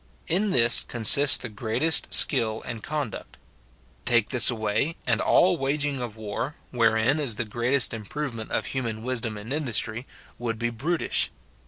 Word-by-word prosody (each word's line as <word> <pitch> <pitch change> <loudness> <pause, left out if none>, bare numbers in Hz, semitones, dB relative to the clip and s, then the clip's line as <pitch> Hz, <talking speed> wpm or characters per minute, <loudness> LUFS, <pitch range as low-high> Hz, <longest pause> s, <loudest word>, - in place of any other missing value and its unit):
In 195 +5 0
this 120 -7 +6
consists 130 +4 +6
the - - -7
greatest 120 +9 0
skill 110 -6 +1
and 115 -2 -7
conduct. 145 -6 -6 0.7
Take 120 -3 +2
this 120 -3 +6
away, 110 +6 -2
and 115 -3 0
all 180 -1 +3
waging 140 -1 -2
of 115 -3 -7
war, 110 +7 -5 0.2
wherein 115 +3 +1
is 135 -7 -1
the 120 - -3
greatest 120 +5 0
im 110 -2 -7
provement 120 -7 -6
of - - -2
human 115 -4 -5
wisdom 120 -3 -3
and 105 +6 -7
industry, 120 -4 -1 0.3
would 115 -2 -4
be 120 +1 -3
brutish. 155 +9 -1
120 Hz, 155 wpm, -24 LUFS, 110-140 Hz, 0.7 s, this